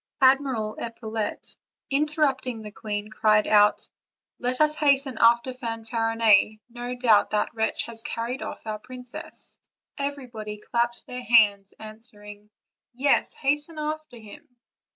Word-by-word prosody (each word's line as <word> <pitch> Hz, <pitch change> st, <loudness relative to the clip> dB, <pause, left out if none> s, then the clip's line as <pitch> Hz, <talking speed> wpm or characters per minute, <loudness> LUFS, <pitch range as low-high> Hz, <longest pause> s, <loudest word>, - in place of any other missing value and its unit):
Admiral 260 Hz, -5 st, +3 dB
Epaulette, 225 Hz, -2 st, -5 dB, 0.4 s
interrupting 275 Hz, -5 st, 0 dB
the 210 Hz, -, -8 dB
queen, 210 Hz, 0 st, -5 dB
cried 215 Hz, -1 st, +3 dB
out: 210 Hz, -1 st, +4 dB, 0.5 s
"Let 250 Hz, +1 st, +1 dB
us 305 Hz, 0 st, +4 dB
hasten 275 Hz, -4 st, +2 dB
after 235 Hz, +2 st, +4 dB
Fanfarinet; 225 Hz, -3 st, +1 dB
no 245 Hz, +1 st, -5 dB
doubt 230 Hz, -5 st, +4 dB
that 210 Hz, +2 st, -1 dB
wretch 220 Hz, -1 st, 0 dB
has 230 Hz, -1 st, -8 dB
carried 235 Hz, +3 st, -4 dB
off -, -, -7 dB
our 215 Hz, -1 st, -4 dB
princess." 250 Hz, +2 st, -11 dB, 0.4 s
Everybody 250 Hz, -7 st, -5 dB
clapped 235 Hz, +2 st, -2 dB
their 250 Hz, 0 st, -6 dB
hands, 205 Hz, -5 st, +4 dB
answering: 210 Hz, -1 st, -10 dB, 0.5 s
''Yes, 275 Hz, +3 st, +2 dB
hasten 295 Hz, +3 st, -1 dB
after 305 Hz, -3 st, -4 dB
him." 225 Hz, +3 st, -14 dB
235 Hz, 120 wpm, -25 LUFS, 215-260 Hz, 0.5 s, out